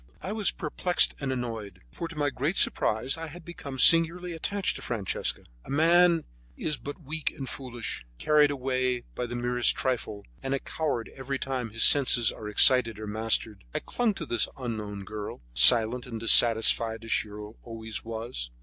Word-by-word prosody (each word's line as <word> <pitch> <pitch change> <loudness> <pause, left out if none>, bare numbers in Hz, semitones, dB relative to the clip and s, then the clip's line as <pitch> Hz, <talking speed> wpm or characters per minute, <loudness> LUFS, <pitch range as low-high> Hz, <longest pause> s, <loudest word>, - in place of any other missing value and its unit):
I 190 - -4
was 215 -2 +1
perplexed 175 +2 0
and 140 -2 -3
annoyed, 115 -7 -5
for 170 - -6
to 165 - -11
my 145 -2 0
great 145 +8 -2
surprise 125 +7 +1
I 165 - -5
had 165 +2 -12
become 140 -6 -8
singularly 170 +5 +5
attached 195 +4 -2
to - - -11
Francesca. 110 -6 -3 0.2
A - - -15
man 165 +3 +4 0.3
is 155 -3 -1
but 145 +4 -9
weak 155 +2 -3
and 135 -3 -6
foolish, 120 - -5
carried 150 - +3
away 130 -2 -1
by 125 - -4
the 120 - -6
merest 120 0 +1
trifle, 110 -5 -3 0.2
and 135 +1 -2
a - - -3
coward 140 -8 -4
every 135 0 -4
time 130 -3 -3
that 110 - -16
his 115 - +2
senses 125 -5 +6
are 105 - -8
excited 115 0 +4
or 110 - -7
mastered. 110 -1 -2
I - - +1
clung 235 -4 -1
to 165 - -6
this 120 - 0
unknown 105 -5 -5
girl, 105 - -8
silent 120 - +5
and 115 -2 -6
dissatisfied 115 0 +4
as 115 - -6
she 105 - +1
always 110 +1 -8
was. 115 - -6
125 Hz, 175 wpm, -27 LUFS, 115-150 Hz, 0.3 s, senses